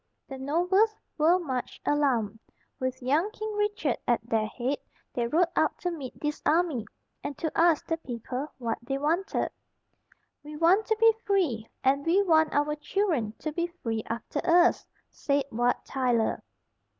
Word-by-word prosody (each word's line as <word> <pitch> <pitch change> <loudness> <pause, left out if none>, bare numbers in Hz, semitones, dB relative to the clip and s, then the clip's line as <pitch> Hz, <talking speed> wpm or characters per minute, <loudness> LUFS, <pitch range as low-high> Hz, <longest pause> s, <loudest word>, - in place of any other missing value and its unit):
The 270 -1 -7
nobles 360 +10 +2 0.2
were 330 +3 +4
much 265 -8 -4
alarmed. 245 -8 +1 0.4
With 260 0 -3
young 300 +10 +2
King 430 -1 -5
Richard 415 - 0
at 235 -2 +1
their 220 -2 +1
head, 255 +5 -2 0.3
they 240 -1 0
rode 335 +6 +3
out - - +2
to 355 - -2
meet 285 -7 -7
this 295 0 -3
army, 305 -9 +1 0.4
and 285 -1 -5
to 320 -3 -2
ask 335 -2 +4
the 325 - -1
people 255 -1 -5
what 235 -3 -2
they 270 +3 -2
wanted. 330 +7 0 0.9
"We 300 +1 -9
want 350 +7 +4
to 440 - +1
be 455 0 +7
free, 310 - 0
and 275 +2 +3
we 360 +6 +3
want 315 -4 +4
our 295 +1 +1
children 300 - 0
to 310 - -4
be 340 +3 -1
free 230 -11 -4
after 235 +5 -4
us," 350 +1 +4 0.2
said 280 -1 0
Wat 240 +2 0
Tyler. 245 -4 0
295 Hz, 160 wpm, -28 LUFS, 250-345 Hz, 0.9 s, be